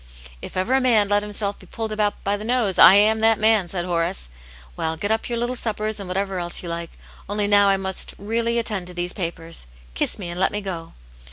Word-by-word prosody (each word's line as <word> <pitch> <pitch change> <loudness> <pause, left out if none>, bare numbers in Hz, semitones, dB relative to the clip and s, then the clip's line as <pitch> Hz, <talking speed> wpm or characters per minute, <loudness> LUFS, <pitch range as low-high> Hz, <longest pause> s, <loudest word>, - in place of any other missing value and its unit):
" 60 - -15
If - - -8
ever 190 +8 0
a 265 - +3
man 220 -5 +3
let 205 0 +3
himself 205 -1 -3
be 185 - -16
pulled 225 +2 -5
about 210 -1 -1
by 200 +1 0
the 205 - -7
nose, 230 -5 0
I 190 - +9
am 215 +2 +5
that 225 0 +4
man," 215 -4 +3
said 175 -1 -2
Horace. 170 - -1 0.5
"Well, 160 0 -2
get 205 +6 -2
up 220 +2 -1
your 235 - -2
little 240 +2 -1
suppers, 215 -2 -2
and 195 - -7
whatever 190 0 -2
else 175 +1 -2
you 175 - -5
like. 170 0 -4 0.4
Only 205 0 0
now 205 0 +5
I - - +4 0.4
really 230 +3 -1
must 235 -1 0
attend 195 -4 -4
to 180 - -8
these 175 0 -1
papers. 165 - -3 0.3
Kiss 60 - 0
me, 185 -4 -6
and 175 +1 -5
let 190 - +2
me 205 - -2
go." 180 -5 -6
205 Hz, 240 wpm, -22 LUFS, 180-220 Hz, 0.5 s, I